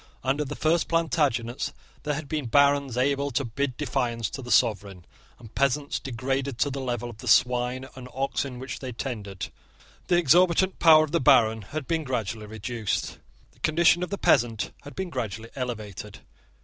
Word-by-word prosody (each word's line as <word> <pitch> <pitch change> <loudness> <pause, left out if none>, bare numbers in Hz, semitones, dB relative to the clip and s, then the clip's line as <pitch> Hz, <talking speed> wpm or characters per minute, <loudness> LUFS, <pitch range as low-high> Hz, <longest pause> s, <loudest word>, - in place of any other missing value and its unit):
Under 140 +3 +1
the 145 +1 -6
first 160 +1 +1
Plantagenets 145 -8 0 0.3
there 150 0 -2
had 150 0 -6
been 150 -3 -3
barons 140 -1 +3
able 140 +2 +1
to 135 +1 -1
bid 130 +2 -3
defiance 120 -5 -1
to 135 - -6
the 120 - -9
sovereign, 100 -6 +1 0.3
and 115 -3 -14
peasants 140 +1 0
degraded 135 +1 -3
to 140 +4 +1
the 135 0 -4
level 120 -2 -3
of 115 -2 -10
the 125 - -9
swine 125 +2 +2
and 125 -1 -9
oxen 135 -1 -2
which 130 +1 -6
they 130 -2 -6
tended. 105 -6 -5 0.6
The 175 - +3
exorbitant 175 +3 +4
power 155 -2 +7
of 155 - -4
the 170 - +1
baron 110 -3 +5
had 140 +8 -6
been 165 -1 0
gradually 115 -5 -3
reduced. 110 0 -3 0.3
The - - -27
condition 170 +2 +3
of 180 - -2
the 200 - -3
peasant 110 - +2
had 145 - -11
been 190 -2 -4
gradually 115 -3 -5
elevated. 105 -5 -6
130 Hz, 175 wpm, -26 LUFS, 115-145 Hz, 0.6 s, power